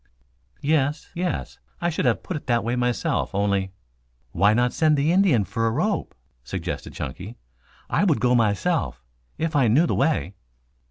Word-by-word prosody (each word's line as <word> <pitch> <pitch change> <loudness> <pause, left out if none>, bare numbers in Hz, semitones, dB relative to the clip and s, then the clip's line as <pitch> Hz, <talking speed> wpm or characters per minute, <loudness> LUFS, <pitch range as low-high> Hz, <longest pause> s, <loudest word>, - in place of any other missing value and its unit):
"Yes, 145 0 +1
yes. 180 +1 -3 0.2
I 175 0 0
should 155 - -2
have 120 -3 +1
put 185 - -4
it 150 - -7
that 120 -2 +2
way 120 +2 -1
myself 125 -5 -1
only 100 -1 0 0.3
" - - -42
"Why 100 +9 +4
not 120 +1 +2
send 155 -2 +3
the 145 +3 +2
Indian 175 - +4
for 115 +4 -1
a - - +1
rope?" 180 - -1 0.3
suggested - - -5
Chunky. 90 - -6 0.5
"I - - +1
would - - +2
go 125 +1 +2
myself 115 - 0 0.3
if 165 -1 -2
I 135 -4 +4
knew 135 +10 +4
the - - 0
way." 150 - 0
125 Hz, 170 wpm, -24 LUFS, 105-155 Hz, 0.5 s, Why